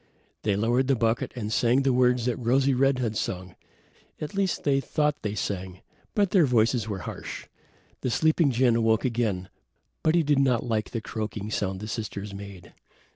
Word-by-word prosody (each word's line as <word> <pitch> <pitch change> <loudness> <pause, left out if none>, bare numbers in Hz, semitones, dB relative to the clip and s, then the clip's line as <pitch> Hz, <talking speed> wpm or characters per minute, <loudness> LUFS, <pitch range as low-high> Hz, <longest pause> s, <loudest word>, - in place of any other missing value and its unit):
They 105 -2 +1
lowered 120 +5 +1
the 135 - +3
bucket 115 0 0
and 110 -3 -3
sang 125 +5 +3
the 135 -1 +2
words 125 -1 +3
that 125 -2 +1
Rosy 130 +3 +2
red 135 +1 +3
had 115 -4 -2
sung. 90 -3 -4 0.6
At 150 - -5
least 195 -2 0
they 140 -2 +3
thought 150 +1 0
they 105 0 -3
sang; 95 -3 -4 0.3
but 200 -3 +2
their 175 -7 +5
voices 115 -2 +2
were 100 -4 -4
harsh. - - -7 0.6
The - - -1
sleeping 155 +5 +3
jinn 125 -1 +3
awoke 115 0 +2
again, 110 -7 -1 0.5
but 155 +1 +2
he 170 - +4
did 145 -2 +2
not 130 -4 +2
like 110 -3 -1
the 115 - -4
croaking 110 -1 -5
sound 95 -2 -2
the 105 - -5
sisters 105 -3 -5
made. 100 -3 -10
120 Hz, 185 wpm, -26 LUFS, 105-135 Hz, 0.6 s, their